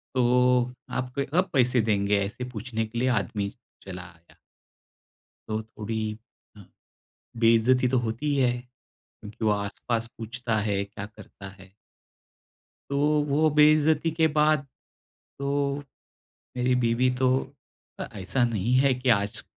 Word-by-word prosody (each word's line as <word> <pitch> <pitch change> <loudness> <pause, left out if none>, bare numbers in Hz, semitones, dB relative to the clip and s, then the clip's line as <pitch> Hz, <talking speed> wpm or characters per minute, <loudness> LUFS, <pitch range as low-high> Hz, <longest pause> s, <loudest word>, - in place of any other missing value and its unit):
तो 125 0 +3 0.2
आपके 125 +2 -3
अब 185 - +1
पैसे 125 -2 +4
देंगे 100 -1 +1
ऐसे 105 +5 -6
पूछने 115 -1 -3
के 120 +2 -5
लिए 130 - +1 0.2
आदमी 100 +2 -3 0.4
चला 90 -2 -7
आया। 85 -1 -18 1.1
तो 110 0 -2
थोड़ी 110 0 -5 0.5
अ, - - -13 0.8
बेइज्जती 115 +3 +4
तो 130 +1 +1
होती 115 +6 -4
ही - - 0
है 125 -2 +3
क्योंकि 115 -3 -11
वो 105 - +4
आसपास 110 +3 -2
पूछता 115 0 -3
है, 100 -1 0
क्या 100 0 -8
करता 100 -2 -12
है? 95 -1 -16 1.2
तो 140 - 0 0.3
वो 155 +3 +3
बेइज्जती 150 +1 +4
के 160 0 +2
बाद 150 -2 +3 0.7
तो 140 0 0 0.8
मेरी 125 +1 +2
बीवी 120 +2 +2
तो 130 - +3 0.9
ऐसा 100 +7 0
नहीं 115 +1 -1
है 135 -1 +4
कि 125 0 -1
आज 100 -3 +1
120 Hz, 130 wpm, -26 LUFS, 105-130 Hz, 1.2 s, पैसे